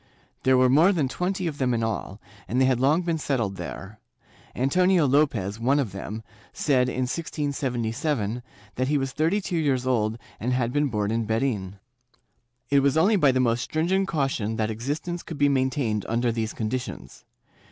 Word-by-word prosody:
There 130 0 +4
were 130 0 +5
more 155 +9 +5
than 160 -8 +1
twenty 185 +6 -2
of 155 -4 -3
them 125 -2 +1
in 115 - -1
all, 110 -2 -3 0.3
and 125 - 0
they 130 - +5
had 130 -2 +2
long 150 +7 +3
been 165 -2 -1
settled 115 -10 -1
there; 95 +4 -7 0.6
Antonio 180 +6 +3
Lopez, 125 -8 +1
one 130 +5 +2
of 130 -8 0
them, 105 +3 -6 0.3
said, 130 -4 +1
in 130 - -2
1677, 125 -4 -2 0.4
that 130 +1 0
he 150 +1 +2
was 135 -1 -2
thirty 160 +9 +1
two 185 -3 -3
years 135 -5 +1
old 110 -3 +1 0.2
and 125 +3 -1
had 125 -1 0
been 145 0 +2
born 105 -4 -1
in 115 0 0
Berin.^ 110 -5 -1 1.0
It 140 - +6
was 140 +1 +2
only 195 +7 +4
by 150 -8 +4
the 130 - 0
most 120 -1 +2
stringent 180 +7 0
caution 135 - -1
that 110 0 -1
existence 150 +10 -3
could 160 - -8
be 145 0 +4
maintained 130 -6 0
under 120 +1 +1
these 110 -1 -2
conditions. 120 +3 -5
130 Hz, 180 wpm, -25 LUFS, 115-150 Hz, 1.0 s, It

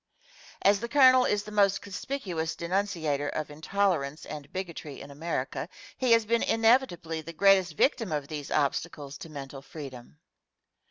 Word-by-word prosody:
As 200 0 +5
the 235 +2 -5
Colonel 255 -2 +6
is 205 0 +1
the 210 - -9
most 200 -2 +3
conspicuous 185 -6 -4
denunciator 170 -6 -1
of 155 -1 -4
intolerance 155 -2 -1
and 145 -1 -8
bigotry 170 -6 -6
in 140 - -10
America, 150 0 -3 0.3
he 255 -2 0
has 230 -1 +4
been 235 +2 +2
inevitably 225 -9 +2
the 165 +2 -9
greatest 190 -3 +4
victim 225 - +2
of 145 -2 -2
these 150 -2 -6
obstacles 145 0 -1
to 175 -4 -9
mental 140 -2 -8
freedom. 135 - -10
170 Hz, 150 wpm, -28 LUFS, 145-205 Hz, 0.3 s, Colonel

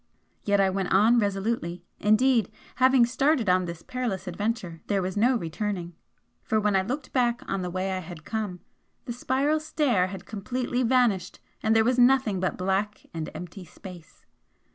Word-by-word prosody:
Yet 200 -1 +2
I 195 -1 +3
went 190 -1 -2
on 220 +5 +5
resolutely, 195 -4 -2
indeed, 220 0 +3 0.3
having 260 -1 +5
started 265 0 +1
on 185 0 +3
this 170 -1 -7
perilous 240 -7 -3
adventure, 180 -3 -3
there 200 -1 +1
was 185 0 -3
no 240 +5 +3
returning, 180 -2 -3 0.5
for 220 - 0
when 210 -1 +1
I 190 - +4
looked 255 +10 -5
back 240 -2 +1
on 195 -1 -2
the 180 - -3
way 185 +2 -2
I 185 - -2
had 170 -3 -10
come, 210 -5 -4 0.4
the 240 - -4
spiral 275 +5 0
stair 290 - +1
had 190 0 -8
completely 245 +4 -3
vanished, 230 -7 +1 0.2
and 220 0 +2
there 220 - +5
was 250 +1 +2
nothing 245 -6 +4
but 185 0 -1
black 195 +3 -1
and 160 -1 -4
empty 180 +2 -8
space! 175 -1 -13
205 Hz, 170 wpm, -26 LUFS, 185-245 Hz, 0.5 s, on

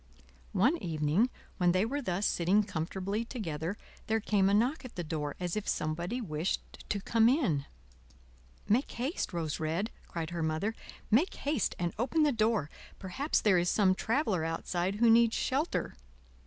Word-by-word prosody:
One 240 - +3
evening, 160 +7 +1 0.3
when 175 -2 +3
they 185 +3 +3
were 285 +5 -2
thus 195 -4 -1
sitting 185 +5 +3
comfortably 190 +5 -3
together, 185 - -4 0.3
there 220 0 +2
came 200 -2 +2
a - - +2
knock 250 +9 +1
at 255 - -10
the 175 - -3
door 150 -2 -3
as 175 -1 -2
if 215 - -3
somebody 170 +10 -1
wished 165 -5 -3
to 205 - 0
come 225 +3 +4
in. 195 - +1 1.0
"Make 240 +7 +2
haste, 260 - -2
Rose 165 -4 -2
Red," 165 +7 -1 0.2
cried 165 -1 -4
her 170 -1 -3
Mother; 160 +7 0 0.4
"make 280 - +3
haste 285 -6 -1
and 175 -1 -1
open 270 +7 +2
the 295 - +4
door; 220 - +1 0.3
perhaps 265 - -1
there 195 -4 +4
is 175 0 +1
some 195 -3 +4
traveler 220 - 0
outside 175 +3 -1
who 235 +3 +3
needs 230 0 +5
shelter." 280 +6 -1
200 Hz, 165 wpm, -31 LUFS, 170-235 Hz, 1.0 s, needs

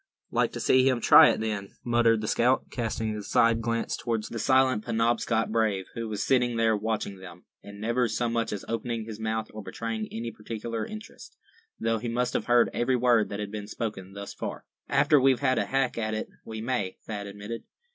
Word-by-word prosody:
"Like - - +1
to - - -5
see 130 +1 +4
him 130 -2 +1
try - - +8
it, - - 0
then," 105 -3 -3
muttered 120 -2 +3
the 110 - -3
scout, 125 +4 +2
casting 110 -2 -2
a 105 - -4
side 115 +2 +3
glance 115 0 -1
toward 115 -2 -2
the 115 - -6
silent 130 -2 +3
Penobscot 115 -1 +1
brave, 110 -4 +1
who 115 -1 -4
was 105 -1 -2
sitting 125 -3 +2
there 115 -1 +3
watching 105 -2 -2
them, 90 -2 -12 0.2
and 100 0 -11
never 120 +3 +1
so 120 +2 -1
much 115 -1 -1
as 100 - -5
opening 115 -1 -3
his 110 -1 -8
mouth, 110 0 -2
or 110 - -6
betraying 110 +1 -4
any 115 +1 -4
particular 110 +1 -5
interest, 215 - -10 0.4
though 115 -1 0
he 120 +2 -4
must 125 +1 0
have - - -1
heard 120 -1 +4
every 125 +2 +1
word 120 -3 +3
that 100 - -5
had 105 -1 -4
been 105 -1 -6
spoken 105 -4 -5
thus 100 0 -7
far. - - -6 0.2
"After 145 +1 +4
we've 135 -1 +4
had 130 -2 +2
a - - 0
hack 135 -3 0
at 110 -1 -1
it, 110 - -4
we 110 -1 -6
may," 115 -6 -2
Thad 105 -2 -5
admitted. 105 +3 -7
115 Hz, 205 wpm, -27 LUFS, 110-120 Hz, 0.4 s, try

